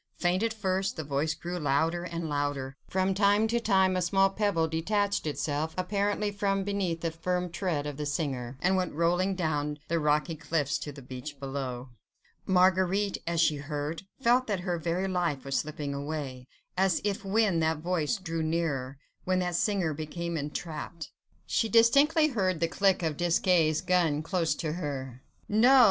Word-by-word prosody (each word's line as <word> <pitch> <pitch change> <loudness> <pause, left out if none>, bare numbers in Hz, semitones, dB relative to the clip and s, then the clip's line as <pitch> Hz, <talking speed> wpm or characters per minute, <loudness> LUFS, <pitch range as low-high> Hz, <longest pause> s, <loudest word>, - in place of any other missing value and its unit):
Faint 180 +2 +1
at 230 0 +1
first, 195 -3 -1
the 160 - -4
voice 150 +2 -1
grew 175 +2 -5
louder 160 +4 +1
and 170 -2 -4
louder; 145 -2 -2
from 190 +1 +1
time 205 +2 +3
to 235 +2 +1
time 190 -4 +3
a 185 - +1
small 195 +2 +3
pebble 195 -6 +1
detached 200 +4 0
itself 150 +1 -2
apparently 205 +2 0
from 195 -1 0
beneath 190 -4 -1
the 165 - -1
firm 180 +2 -2
tread 175 -5 -1
of 145 -2 -5
the 150 - -3
singer, 135 -4 -3
and 190 +1 +3
went 180 -5 -1
rolling 175 +4 +2
down 150 -4 -1
the 170 0 +1
rocky 150 +2 +1
cliffs 150 -2 -1
to 145 - -5
the 140 -1 -11
beach 130 +3 -8
below. 135 -2 -4 0.6
Marguerite 190 +2 +3
as 170 -1 0
she 155 -2 +3
heard, 145 +2 -4 0.2
felt 250 0 +3
that 200 -4 -1
her 175 -2 -2
very 170 +4 -1
life 170 -8 -1
was 135 -1 0
slipping 145 -1 -4
away, 140 -3 -5 0.3
as 190 -1 +2
if 200 -1 -1
when 200 -3 +2
that 160 0 +1
voice 170 +4 0
drew 165 -4 -3
nearer, 155 -5 -1 0.3
when 185 0 +2
that 180 -1 0
singer 180 -3 +1
became 170 +3 -4
entrapped... 155 +2 -5 0.3
She 225 - 0
distinctly 280 - +5
heard 190 - 0
the 165 - +2
click 190 +1 +2
of 155 -3 -1
Desgas' 170 -2 +2
gun 170 -4 +2
close 165 -3 0
to 155 -1 -3
her.... 135 -6 -5 0.3
No! 210 - +1
no! - - +5
no! 265 +3 +7
170 Hz, 175 wpm, -29 LUFS, 150-190 Hz, 0.6 s, no